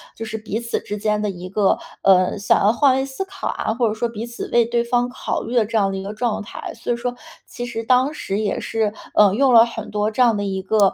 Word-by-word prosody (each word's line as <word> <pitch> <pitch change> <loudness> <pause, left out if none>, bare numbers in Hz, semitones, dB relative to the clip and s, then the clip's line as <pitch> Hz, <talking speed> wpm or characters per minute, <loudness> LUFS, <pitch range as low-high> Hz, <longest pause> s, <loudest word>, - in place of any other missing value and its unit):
就 225 - -6
是 220 0 -4
彼 215 0 -4
此 235 0 -2
之 210 - -6
间 210 0 0
的 210 - -1
一 180 -1 -7
个， 200 0 +2 0.2
呃 185 0 +4
想 200 - +3
要 205 - +5
换 260 +2 +3
位 265 0 0
思 275 +8 -4
考 385 -1 -6
啊， 220 - -2
或 235 -1 +1
者 215 - -1
说 235 +2 -2
彼 225 0 -6
此 235 0 -7
为 235 -1 +4
对 235 0 0
方 245 +1 +1
考 - - -3
虑 230 - -6
的 225 -3 +4
这 225 +1 -1
样 195 -2 +2
的 195 - -3
一 190 - -4
个 205 +2 -5
状 225 -1 -1
态。 205 - -7
所 230 - -4
以 - - +2
说 245 +1 -3 0.3
其 245 - -7
实 230 -1 -4
当 255 +4 +3
时 200 -7 -3
也 215 - -1
是 220 -2 -1 0.2
嗯 205 -1 +5
用 265 0 +3
了 230 0 +8
很 225 -3 -7
多 210 +1 0
这 235 +4 -1
样 230 -3 +4
的 205 - -2
一 190 -1 -3
个， 200 -1 +3
220 Hz, 295 characters per minute, -21 LUFS, 205-240 Hz, 0.3 s, 了